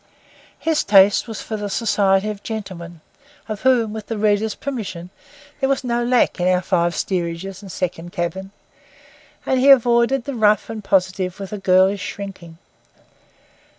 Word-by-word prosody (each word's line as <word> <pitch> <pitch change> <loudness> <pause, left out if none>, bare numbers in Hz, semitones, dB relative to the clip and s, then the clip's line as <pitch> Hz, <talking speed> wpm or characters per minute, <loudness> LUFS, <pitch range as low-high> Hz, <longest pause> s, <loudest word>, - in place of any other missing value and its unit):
His 320 -2 0
taste 200 +1 +5
was 225 -2 -6
for 220 - -4
the 205 -1 -4
society 200 -2 +1
of 205 -1 -9
gentlemen, 180 -7 -7 0.5
of 215 -2 -5
whom, 240 -5 +2
with 220 -2 -7
the 225 - -4
reader's 210 0 +1
permission, 195 -10 -6 0.5
there 270 -1 0
was 275 -1 0
no 240 -1 -1
lack 245 -4 +2
in 175 - +1
our 180 0 +2
five 175 -2 +1
steerages 180 +1 -3
and 195 -2 -10
second 175 -1 -4
cabin; 185 +3 -4 1.0
and 260 - +1
he 270 +2 +4
avoided 240 0 +4
the 280 - -5
rough 215 -2 +2
and 220 -2 -7
positive 185 -1 0
with 195 +1 -7
a 210 - -4
girlish 190 +1 +3
shrinking. 190 -5 -8
205 Hz, 155 wpm, -20 LUFS, 185-225 Hz, 1.0 s, taste